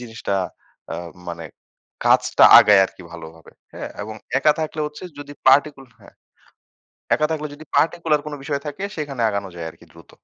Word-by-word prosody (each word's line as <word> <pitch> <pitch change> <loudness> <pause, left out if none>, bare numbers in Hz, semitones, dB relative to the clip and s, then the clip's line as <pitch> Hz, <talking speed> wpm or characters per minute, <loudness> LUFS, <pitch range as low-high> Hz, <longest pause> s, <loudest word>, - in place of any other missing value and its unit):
জিনিসটা 115 -4 -4 0.6
আ - - -4 0.3
মানে 85 -1 -6 0.6
কাজটা - - +4
আগায় 105 -2 +6
আরকি 95 - -15
ভালোভাবে, 80 -1 -12 0.2
হ্যাঁ? - - -7
এবং 110 +1 -7 0.2
একা 150 +2 +4
থাকলে 155 0 -4
হচ্ছে 150 - -10 0.2
যদি 145 0 -9 0.2
পার্টিকুল 140 0 +3 0.2
হ্যাঁ। 100 - -18 1.0
একা 155 - +1
থাকলে 150 -1 -3
যদি 155 - -13
পার্টিকুলার 165 -2 +2
কোনো 150 -1 -5
বিষয় 140 -1 -3
থাকে 150 +7 -5
সেখানে 140 -6 -4
আগানো 100 -1 -3
যায় 85 -1 -6
আরকি - - -19
দ্রুত। - - -17
140 Hz, 160 wpm, -21 LUFS, 100-150 Hz, 1.0 s, আগায়